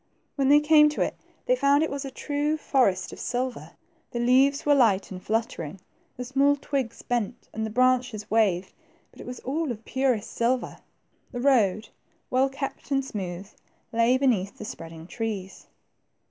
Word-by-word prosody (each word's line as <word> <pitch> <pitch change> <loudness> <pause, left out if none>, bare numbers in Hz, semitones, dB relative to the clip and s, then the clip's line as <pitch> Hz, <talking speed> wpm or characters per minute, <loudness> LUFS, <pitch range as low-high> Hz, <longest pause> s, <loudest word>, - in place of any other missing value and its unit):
When 275 -1 +1
they 290 +1 +7
came 300 0 +6
to 300 - -4
it, - - 0 0.3
they - - +3
found 285 - +3
it 320 - -2
was 280 0 -4
a - - -4
true 290 +3 -1
forest 200 -12 +1
of - - -10
silver. 245 - -3 0.4
The 240 - -4
leaves 265 +4 +3
were 295 - +5
light 220 -9 +3
and 185 -1 -7
fluttering, 215 - -3 0.4
the 250 - -4
small 275 +3 +3
twigs 275 -4 -3
bent, 240 -2 -3
and 220 - -3
the - - -6
branches 250 -2 +1
waved, 195 -5 +2 0.4
but - - -13
it - - -10
was 250 0 -7
all 295 +2 -2
of 225 -1 -8
purest 260 -5 0
silver. 245 +2 -1 0.5
The 245 - -5
road, 220 -6 +2 0.4
well 260 +2 +3
kept 275 +1 -6
and 275 -1 +1
smooth, 190 -5 -5 0.5
lay 230 +3 +4
beneath 230 -8 +1
the 215 - -7
spreading 165 -4 -9
trees. 200 -2 -5
250 Hz, 170 wpm, -26 LUFS, 210-275 Hz, 0.5 s, they